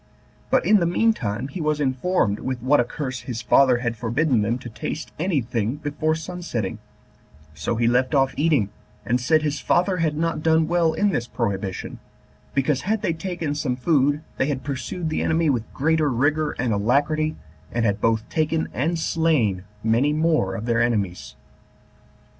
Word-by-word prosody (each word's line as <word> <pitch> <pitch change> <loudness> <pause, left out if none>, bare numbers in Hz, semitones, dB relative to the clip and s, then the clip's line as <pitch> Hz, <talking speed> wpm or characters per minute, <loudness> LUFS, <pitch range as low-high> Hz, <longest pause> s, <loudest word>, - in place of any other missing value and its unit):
But, - - +2
in 215 - +6
the 170 - +1
mean 225 +6 +3
time, 115 - -3
he 165 +5 -5
was 150 -1 0
informed 130 - +1
with 130 -1 -3
what 140 +3 +4
a - - +5
curse 130 0 -5
his 120 -1 -6
father 125 0 +5
had 120 0 0
forbidden 120 +2 +1
them 115 +3 0
to 125 - -9
taste 150 +7 -5
any 165 -4 +1
thing 115 +1 -2
before 155 +1 -1
sun 175 +3 -6
setting: 115 - -3 0.7
so 75 +9 -2
he 115 +1 +1
left 125 +3 +2
off 135 -1 +3
eating, 145 -10 +2 0.3
and 125 +2 +1
said 155 +5 +3
his 150 -1 -1
father 180 +1 +1
had 155 -3 0
not 165 -1 -1
done 160 0 +3
well 170 -1 +2
in 205 - +2
this 120 -10 -1
prohibition, 100 -6 -3 0.6
because, 135 0 +1
had 215 +1 -1
they 165 - +1
taken 165 -2 -3
some 145 -4 -1
food, 145 +2 +2
they 135 - +1
had 135 -3 -2
pursued 145 +4 -4
the - - -1
enemy 160 -1 +2
with 120 -4 -3
greater 155 +1 +1
rigor 145 +4 +1
and 125 -3 -1
alacrity, 145 +9 +1 0.4
and 120 -1 0
had 100 -2 0
both 110 -1 +1
taken 160 0 0
and 160 +7 0
slain 150 - +1 0.2
many 120 +7 +2
more 155 - +1
of 105 - -5
their 120 -1 +2
enemies. 105 -7 -1
140 Hz, 180 wpm, -23 LUFS, 120-160 Hz, 0.7 s, in